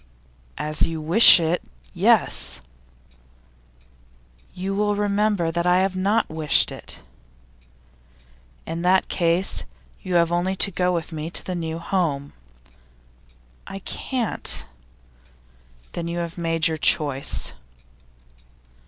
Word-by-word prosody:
'As 150 Hz, 0 st, -3 dB
you 165 Hz, -1 st, 0 dB
wish 170 Hz, +7 st, +8 dB
it 165 Hz, +1 st, -1 dB, 0.3 s
yes.' -, -, +2 dB, 2.0 s
'You 190 Hz, +2 st, -4 dB
will 205 Hz, +1 st, 0 dB
remember 205 Hz, -4 st, 0 dB
that 170 Hz, +1 st, -2 dB
I 180 Hz, +1 st, +4 dB
have 190 Hz, 0 st, -1 dB
not 200 Hz, +4 st, +1 dB
wished 155 Hz, -2 st, +2 dB
it.' -, -, -9 dB, 1.6 s
'In 165 Hz, +1 st, -5 dB
that 185 Hz, +2 st, +2 dB
case, 175 Hz, +2 st, +1 dB, 0.4 s
you 185 Hz, -2 st, -4 dB
have 170 Hz, -1 st, +3 dB
only 175 Hz, +2 st, 0 dB
to 200 Hz, -, +1 dB
go 180 Hz, 0 st, 0 dB
with 170 Hz, -1 st, -3 dB
me 155 Hz, 0 st, -5 dB
to -, -, -3 dB
the 185 Hz, -, -4 dB
new 165 Hz, -2 st, -4 dB
home.' 165 Hz, -6 st, -2 dB, 1.3 s
'I 195 Hz, -, -7 dB
can't.' 250 Hz, -4 st, -2 dB, 1.3 s
'Then 170 Hz, -1 st, -5 dB
you 170 Hz, +1 st, -4 dB
have 170 Hz, -1 st, -4 dB
made 165 Hz, -2 st, 0 dB
your 160 Hz, -1 st, -2 dB
choice. 145 Hz, -2 st, +1 dB
175 Hz, 115 wpm, -22 LUFS, 165-190 Hz, 2.0 s, wish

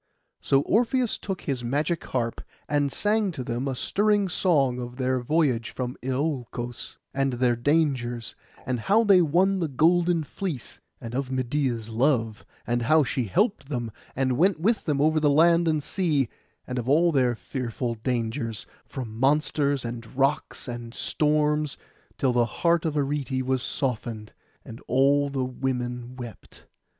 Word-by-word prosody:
So 135 Hz, -, +3 dB
Orpheus 240 Hz, -, +1 dB
took 195 Hz, -2 st, -4 dB
his 130 Hz, -4 st, -3 dB
magic 150 Hz, +7 st, -1 dB
harp, 115 Hz, -3 st, -2 dB, 0.3 s
and 145 Hz, -1 st, +1 dB
sang 210 Hz, +3 st, +1 dB
to 135 Hz, -5 st, -5 dB
them 125 Hz, +1 st, -3 dB
a 135 Hz, -, -2 dB
stirring 205 Hz, +6 st, +1 dB
song 140 Hz, -9 st, +2 dB
of 120 Hz, 0 st, -7 dB
their 130 Hz, -1 st, 0 dB
voyage 125 Hz, -3 st, +1 dB
from 125 Hz, -1 st, -4 dB
Iolcos, 125 Hz, -3 st, -3 dB, 0.2 s
and 135 Hz, -1 st, 0 dB
their 120 Hz, 0 st, +2 dB
dangers, 125 Hz, -3 st, 0 dB, 0.3 s
and 130 Hz, -2 st, -1 dB
how 205 Hz, -, +3 dB
they 195 Hz, -4 st, +6 dB
won 185 Hz, +5 st, +2 dB
the 165 Hz, -, 0 dB
golden 170 Hz, +4 st, +3 dB
fleece; 155 Hz, -4 st, -5 dB, 0.2 s
and 115 Hz, -2 st, -7 dB
of 135 Hz, 0 st, -2 dB
Medeia's 130 Hz, -3 st, -1 dB
love, 115 Hz, -2 st, +1 dB, 0.2 s
and 120 Hz, 0 st, 0 dB
how 155 Hz, +6 st, +4 dB
she 125 Hz, -1 st, -1 dB
helped 190 Hz, -, 0 dB
them, 120 Hz, -5 st, -3 dB, 0.2 s
and 130 Hz, -1 st, 0 dB
went 185 Hz, -1 st, +3 dB
with 215 Hz, +6 st, +1 dB
them 145 Hz, -3 st, 0 dB
over 155 Hz, +2 st, +3 dB
land 165 Hz, +3 st, +4 dB
and 155 Hz, -2 st, +1 dB
sea; 150 Hz, -, 0 dB, 0.4 s
and 125 Hz, 0 st, -3 dB
of 120 Hz, +1 st, -3 dB
all 165 Hz, +4 st, +4 dB
their 125 Hz, -5 st, +2 dB
fearful 120 Hz, -1 st, -4 dB
dangers, 115 Hz, -1 st, -3 dB, 0.2 s
from 120 Hz, -5 st, -6 dB
monsters, 140 Hz, -1 st, +2 dB
and 115 Hz, +1 st, -7 dB
rocks, 140 Hz, +1 st, 0 dB
and 120 Hz, -1 st, -6 dB
storms, 150 Hz, -1 st, +1 dB, 0.4 s
till 130 Hz, -2 st, +1 dB
the 120 Hz, -1 st, +3 dB, 0.2 s
heart 170 Hz, -1 st, +4 dB
of 155 Hz, -2 st, -1 dB
Arete 140 Hz, -2 st, -1 dB
was 130 Hz, -1 st, 0 dB
softened, 115 Hz, -5 st, -3 dB, 0.3 s
and 115 Hz, +1 st, -10 dB
all 140 Hz, +3 st, +3 dB
the 135 Hz, -2 st, -1 dB
women 125 Hz, -1 st, -3 dB
wept. 120 Hz, -3 st, -11 dB
135 Hz, 155 wpm, -26 LUFS, 120-155 Hz, 0.4 s, they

